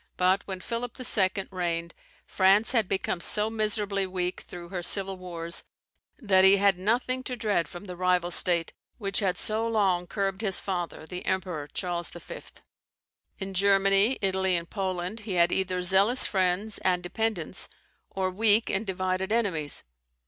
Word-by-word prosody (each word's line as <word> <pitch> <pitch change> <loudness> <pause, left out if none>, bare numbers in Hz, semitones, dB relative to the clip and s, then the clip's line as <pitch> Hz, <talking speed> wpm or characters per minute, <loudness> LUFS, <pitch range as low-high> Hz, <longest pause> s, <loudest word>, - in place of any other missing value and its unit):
But 185 +2 +3
when 190 -2 -6
Philip 235 +3 -5
II. 195 -5 +2
reigned, 170 -2 -3 0.3
France 195 +4 +4
had 225 -6 +2
become 190 -2 -1
so 210 +5 +4
miserably 210 -3 -1
weak 180 -1 -3
through 175 -1 -10
her 180 -1 -4
civil 195 +2 +1
wars, 170 -2 -3 0.5
that 195 -7 +3
he 190 +1 +7
had 200 -2 +3
nothing 245 +6 0
to 250 - -3
dread 205 -8 0
from 175 +5 -10
the 180 -2 -7
rival 180 -1 +1
state, 170 -1 +3 0.2
which 195 -4 -1
had 190 -4 0
so 220 +1 +1
long 195 -6 +1
curbed 195 0 -2
his 195 -4 +1
father 175 -4 -4
the 180 +2 -7
Emperor 175 -6 -2
Charles 175 +2 -3
V. 175 - -9 1.0
In 195 -1 -6
Germany, 195 +4 +3
Italy, 190 -1 +1
and 170 0 -3
Poland 185 +1 -4
he 210 -2 -6
had 175 0 +4
either 185 -1 -1
zealous 200 +7 +3
friends 190 +2 -1
and 180 -1 0
dependents, 190 -2 -1 0.4
or 190 -1 -2
weak 215 +3 +3
and 200 +2 -2
divided 185 +1 -2
enemies. 185 -11 0
190 Hz, 155 wpm, -27 LUFS, 180-205 Hz, 1.0 s, he